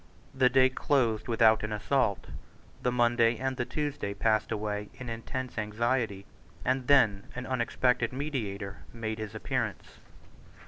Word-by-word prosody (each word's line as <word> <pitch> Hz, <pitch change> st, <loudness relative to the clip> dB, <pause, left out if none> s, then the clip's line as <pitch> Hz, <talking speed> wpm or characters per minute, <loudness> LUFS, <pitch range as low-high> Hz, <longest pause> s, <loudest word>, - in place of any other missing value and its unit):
The 130 Hz, -1 st, +4 dB
day 130 Hz, +1 st, +5 dB
closed 125 Hz, -5 st, +1 dB
without 115 Hz, -2 st, +4 dB
an 105 Hz, -, -4 dB
assault; 105 Hz, 0 st, 0 dB, 0.6 s
the 125 Hz, -, +1 dB
Monday 120 Hz, -1 st, +3 dB
and 130 Hz, +2 st, -2 dB
the 125 Hz, -, -2 dB
Tuesday 145 Hz, -6 st, -3 dB
passed 110 Hz, +1 st, +1 dB
away 105 Hz, -1 st, -3 dB
in 130 Hz, -2 st, -7 dB
intense 120 Hz, +2 st, -4 dB
anxiety; 110 Hz, -2 st, -1 dB, 0.4 s
and 130 Hz, 0 st, 0 dB
then 110 Hz, -9 st, +4 dB
an 125 Hz, 0 st, -5 dB
unexpected 125 Hz, -1 st, +1 dB
mediator 110 Hz, -8 st, -4 dB
made 110 Hz, -1 st, -4 dB
his 110 Hz, 0 st, -6 dB
appearance. 120 Hz, -2 st, -3 dB
120 Hz, 135 wpm, -29 LUFS, 110-130 Hz, 0.6 s, day